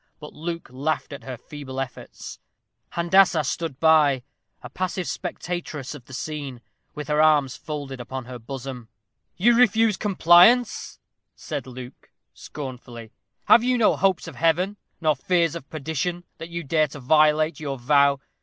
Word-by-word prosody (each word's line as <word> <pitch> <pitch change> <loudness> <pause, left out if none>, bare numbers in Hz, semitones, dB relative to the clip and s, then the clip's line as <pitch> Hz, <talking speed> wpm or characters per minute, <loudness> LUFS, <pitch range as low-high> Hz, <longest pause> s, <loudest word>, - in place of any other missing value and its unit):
But 150 -1 -10
Luke 165 +1 -5
laughed 145 +3 -2
at 140 - -9
her 130 -2 -6
feeble 135 0 -8
efforts. 135 -2 -7 0.5
Handassah 170 -1 +4
stood 155 0 -4
by, 150 -5 +4 0.4
a 125 - -8
passive 185 +2 -3
spectatress 165 -6 -5
of 140 -5 -12
the 130 - -14
scene, 140 -5 -6 0.3
with 150 -1 -6
her 150 0 +2
arms 150 -4 +3
folded 145 -4 -6
upon 130 +1 -6
her 125 0 -8
bosom. 125 -1 -8 0.5
"You 235 +7 +4
refuse 225 -3 +4
compliance," 200 +4 +4 0.4
said - - -6
Luke, 125 0 -11 0.2
scornfully. 125 -5 -9 0.3
"Have 235 - +6
you 250 0 +2
no 225 - +4
hopes 190 -2 +1
of - - -9
Heaven, 180 +5 +1 0.2
no 155 -1 +3
fears 165 +3 +1
of 165 -4 -8
perdition, 160 +3 -3 0.2
that 165 - -7
you 170 0 -5
dare 155 +1 +2
to 145 - -10
violate 155 +4 +3
your 140 -3 -4
vow? 140 +2 +3
155 Hz, 150 wpm, -24 LUFS, 135-175 Hz, 0.5 s, Have